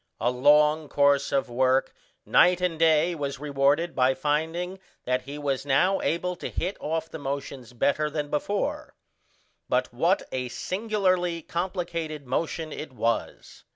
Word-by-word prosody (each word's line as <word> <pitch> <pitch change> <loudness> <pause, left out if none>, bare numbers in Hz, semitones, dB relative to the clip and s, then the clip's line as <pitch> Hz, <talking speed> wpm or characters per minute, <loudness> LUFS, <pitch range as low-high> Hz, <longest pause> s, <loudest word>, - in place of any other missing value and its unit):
A 120 - +1
long 150 +3 +4
course 140 -1 +3
of 135 - +1
work 130 +2 +1 0.3
night 180 0 +5
and 180 -3 -1
day 165 +1 +4
was 140 -4 -4
rewarded 145 +3 +1
by 130 0 +3
finding 160 +6 -1 0.3
that 125 0 0
he 140 +3 -8
was 140 -3 -2
now 180 +8 +2
able 180 +2 -1
to - - -5
hit 185 +4 -3
off 160 +1 -2
the 160 - -8
motions 140 -3 -5
better 145 +5 +1
than 150 -1 -4
before; 200 +7 -2 0.7
but - - 0
what - - +2
a 125 -1 -3
singularly 185 - -1
complicated 170 -4 -3
motion 160 +3 -2
it 150 - -7
was. 115 -2 -3
150 Hz, 145 wpm, -26 LUFS, 140-170 Hz, 0.7 s, night